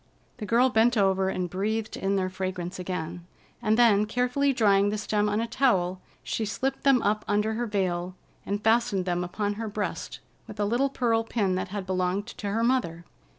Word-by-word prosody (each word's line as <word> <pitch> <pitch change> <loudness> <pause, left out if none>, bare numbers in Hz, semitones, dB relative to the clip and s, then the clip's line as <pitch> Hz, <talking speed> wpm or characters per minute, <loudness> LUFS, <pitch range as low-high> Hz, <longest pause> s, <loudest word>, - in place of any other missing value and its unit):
The 215 -4 -6
girl 245 +3 +4
bent 230 +1 +3
over 190 -1 +2
and 180 -1 -2
breathed 215 +4 -2
in 195 +1 -1
their 190 -1 0
fragrance 185 -1 -4
again, 175 -1 -5 0.3
and 220 -1 +2
then, 215 -3 +5
carefully 250 +5 +1
drying 205 -5 +3
the 210 - -2
stem 210 0 0
on 210 +1 0
a 230 - 0
towel, 190 -7 +1 0.2
she 225 - -2
slipped 260 +6 -2
them 270 -3 +4
up 210 +1 +1
under 210 +2 +1
her 240 +2 -2
veil 185 -3 -1 0.3
and 205 +2 -3
fastened 220 -4 +2
them 175 -1 -1
upon 205 +3 -2
her 225 - -3
breast 210 0 -4 0.3
with 210 - -10
a 205 - +2
little 245 +6 +1
pearl 230 -4 +1
pin 210 -4 0
that 185 - -2
had 200 0 -5
belonged 185 +1 -1
to 210 -3 -6
her 225 +3 0
mother. 175 -10 0
205 Hz, 195 wpm, -27 LUFS, 185-230 Hz, 0.3 s, then